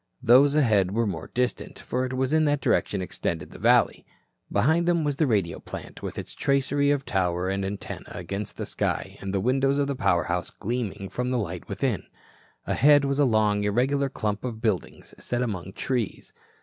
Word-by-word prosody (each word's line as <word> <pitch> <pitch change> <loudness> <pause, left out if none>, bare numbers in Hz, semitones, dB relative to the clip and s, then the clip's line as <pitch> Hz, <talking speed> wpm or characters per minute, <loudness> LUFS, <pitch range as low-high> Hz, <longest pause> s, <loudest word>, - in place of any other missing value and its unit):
Those 135 +4 +6
ahead 110 -10 +3
were 115 +2 +1
more 85 -6 -4
distant, 125 0 -2
for 130 +1 -2
it 130 - -6
was 130 +2 0
in 155 0 +4
that 145 -1 +2
direction 100 -6 +1
extended 80 -3 -4
the - - -11
valley. - - +3 0.5
Behind 165 +5 +2
them 170 -2 +2
was 145 -2 0
the 155 - +2
radio 100 -8 0
plant - - -9
with - - -6
its - - -6
tracery 140 +1 +1
of 145 -1 +1
tower 90 -3 0
and 95 0 -1
antenna 100 +1 -5
against 100 +4 -6
the - - -3
sky - - -2
and 95 - -4
the 100 - 0
windows 135 +5 +2
of 145 - +2
the 140 0 -2
power 95 -7 +2
house 90 +1 -2
gleaming 105 -3 -4
from 125 +5 -3
the 125 - +1
light 90 -6 -4
within. - - -1 0.6
Ahead 145 0 +5
was 140 +1 0
a 145 - +5
long, 105 -3 +2
irregular 135 +7 +1
clump 105 -5 -3
of 120 -3 -4
buildings 110 -5 -2
set 120 0 -1
among 95 -5 -4
trees. 120 -4 -3
120 Hz, 190 wpm, -26 LUFS, 100-140 Hz, 0.6 s, Those